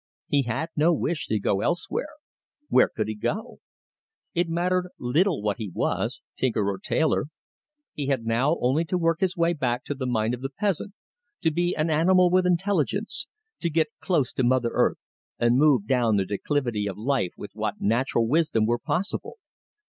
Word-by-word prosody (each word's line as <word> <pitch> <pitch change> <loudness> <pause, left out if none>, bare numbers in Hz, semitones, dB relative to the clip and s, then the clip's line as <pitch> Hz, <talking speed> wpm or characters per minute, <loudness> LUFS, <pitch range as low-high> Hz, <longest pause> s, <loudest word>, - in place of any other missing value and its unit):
He 145 - +3
had 125 +6 -2
no 160 +3 +4
wish 160 +1 -2
to 110 - +1
go 100 0 0
elsewhere 175 - -1 0.6
where - - +5
could 110 -1 -3
he 110 - -2
go? 120 - -4 0.7
It 175 -2 0
mattered 180 +2 0
little 150 - +1
what 105 -1 0
he 110 -4 -5
was, - - -2
tinker 110 -6 0
or 95 - -6
tailor. 160 +10 +1 0.7
He 145 -2 -4
had 130 -5 0
now 125 +8 +2
only 130 +7 +2
to 180 - -1
work 165 -1 +1
his 190 0 0
way 170 0 +2
back 125 -5 -1
to - - -3
the 130 -2 -4
mind 115 -1 0
of 125 - -5
the 135 - -3
peasant; 200 +5 -2 0.5
to 160 - +2
be 175 +3 0
an 155 +1 0
animal 180 +3 +4
with 185 0 +3
intelligence; 200 - 0 0.3
to 170 - -1
get 160 -1 +1
close 155 -10 0
to 130 - 0
mother 125 -1 +2
earth, - - +2 0.4
and 120 +2 +3
move 140 -8 +4
down 120 -3 +2
the 95 - +1
declivity 110 0 -1
of 100 - -5
life 115 -5 0
with 105 - -8
what 105 -1 -3
natural 115 +1 +1
wisdom 145 -6 +2
were 120 +2 +1
possible. 200 - -3
140 Hz, 180 wpm, -25 LUFS, 115-170 Hz, 0.7 s, where